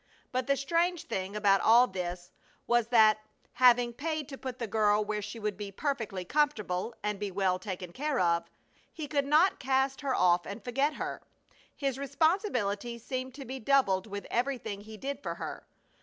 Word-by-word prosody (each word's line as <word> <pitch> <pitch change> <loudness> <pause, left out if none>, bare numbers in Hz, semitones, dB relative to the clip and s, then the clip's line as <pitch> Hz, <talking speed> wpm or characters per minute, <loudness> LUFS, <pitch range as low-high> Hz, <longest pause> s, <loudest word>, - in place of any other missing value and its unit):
But 255 +1 -1
the 275 0 +2
strange 335 +4 +1
thing 195 - -4
about 200 -2 +4
all 235 +3 +7
this 180 -4 -5 0.3
was 240 -2 +2
that, 220 -3 +5 0.3
having 245 -1 +5
paid 310 +2 -3
to 270 - -7
put 255 -2 -5
the 235 - -3
girl 210 0 +2
where 210 0 -2
she 210 +3 -7
would 210 -2 -2
be 205 -1 -6
perfectly 215 -6 -3
comfortable 230 -6 0
and 210 -1 -2
be 205 -1 -2
well 185 -1 0
taken 185 -2 -6
care 290 0 -1
of, 170 -1 +1 0.4
he 310 -3 -6
could 280 -1 0
not 315 +6 +4
cast 265 +1 +1
her 275 -2 0
off 175 -1 +3
and 200 +1 -7
forget 275 +5 0
her. - - -4 0.5
His 275 -2 -2
responsibility 255 - 0
seemed 255 +2 -5
to 275 -1 -8
be 265 +2 -6
doubled 220 -7 +2
with 200 -1 -6
everything 240 -5 -2
he 215 +1 -10
did 275 +3 -5
for - - -4
her. - - -7
235 Hz, 180 wpm, -30 LUFS, 200-275 Hz, 0.5 s, all